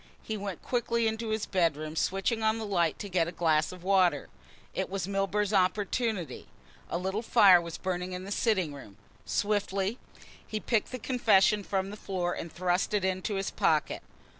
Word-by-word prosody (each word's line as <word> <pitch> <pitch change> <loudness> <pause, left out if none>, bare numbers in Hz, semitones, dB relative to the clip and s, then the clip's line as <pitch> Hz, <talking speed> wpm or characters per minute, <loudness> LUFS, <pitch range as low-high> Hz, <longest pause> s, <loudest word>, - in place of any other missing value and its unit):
He 220 - -3
went 200 -3 -5
quickly 235 -2 0
into 220 0 -1
his 220 -1 -1
bedroom, 155 -4 0
switching 195 +7 0
on 220 0 +2
the 225 - -4
light, 175 -5 +1
to 205 - -6
get 175 -3 +1
a - - -4
glass 160 -3 +1
of 180 -1 -11
water. 185 -6 +2 0.4
It - - -2
was 190 -1 -3
Milburgh's 195 +1 0
opportunity. 195 - 0 0.4
A - - -1
little 190 +4 -2
fire 200 -6 +6
was 170 -1 -6
burning 180 0 -3
in 180 0 -5
the 195 - -8
sitting 190 -9 +1
room. 120 -8 -12 0.3
Swiftly 205 +1 0 0.5
he 215 - -3
picked 225 0 0
the 255 - -4
confession 210 -5 +3
from 195 0 -2
the 210 - -8
floor 180 -4 -2
and 165 - -6
thrust 180 +3 0
it 200 -2 +1
into 190 +2 -1
his 195 0 -2
pocket. - - +1
195 Hz, 180 wpm, -29 LUFS, 180-215 Hz, 0.5 s, fire